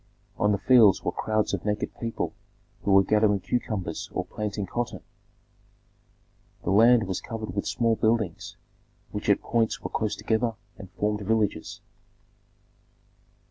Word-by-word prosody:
On 105 - +3
the 100 - +2
fields 115 -2 +5
were - - 0
crowds 110 -1 -1
of 95 - -2
naked 105 0 -2
people 115 -1 -3 0.5
who 100 - 0
were 95 0 +7
gathering 105 0 +3
cucumbers 95 -5 -3
or - - -2
planting 105 -1 -4
cotton. 120 +5 -4 1.6
The 90 - -1
land 115 +3 +6
was 95 -2 -3
covered 110 -1 -6
with 100 - -2
small 115 -1 +1
buildings 110 -5 -1 0.5
which - - -4
at - - +4
points 115 -1 0
were - - -5
close 110 -1 -1
together 110 +2 0 0.2
and 95 - -11
formed 105 0 -1
villages. 105 -5 -1
105 Hz, 140 wpm, -26 LUFS, 100-115 Hz, 1.6 s, were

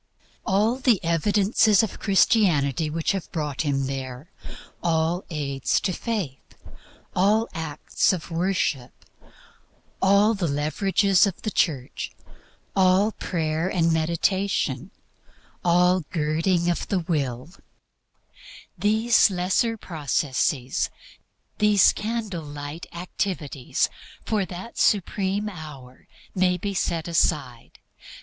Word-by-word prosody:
All 210 +6 +2
the 245 -6 +3
evidences 200 +5 +3
of 220 - -4
Christianity 170 - +2
which 160 +1 -1
have 195 -3 -4
brought 150 -4 -2
him 140 -3 0
there, 130 +2 -6 0.5
all 165 +2 0
aids 140 -5 -1
to 185 - -1
Faith, 190 - -4 0.6
all 210 +5 +3
acts 160 -2 0
of 180 -3 -5
worship, 165 -7 -1 1.1
all 200 +3 +4
the 195 -5 -1
leverages 185 +7 +2
of 190 - -6
the 215 - -2
Church, 135 -10 -1 0.7
all 190 +3 +4
Prayer 160 -3 -2
and 165 -3 +2
Meditation, 170 +5 0 0.7
all 180 +1 +4
girding 165 +2 0
of 175 - -1
the 190 -3 0
Will 145 -4 -2 1.2
these 220 +2 +4
lesser 190 +5 0
processes, 145 - -1 0.7
these 210 -2 +5
candle 215 -5 -3
light 145 +2 -7
activities 170 -6 -2 0.4
for 210 -3 0
that 185 +6 -8
supreme 200 +1 +1
hour, 150 -9 -10 0.3
may 180 -2 +2
be 200 +3 -3
set 170 -3 -1
aside. 135 -7 -1
175 Hz, 100 wpm, -24 LUFS, 150-200 Hz, 1.2 s, these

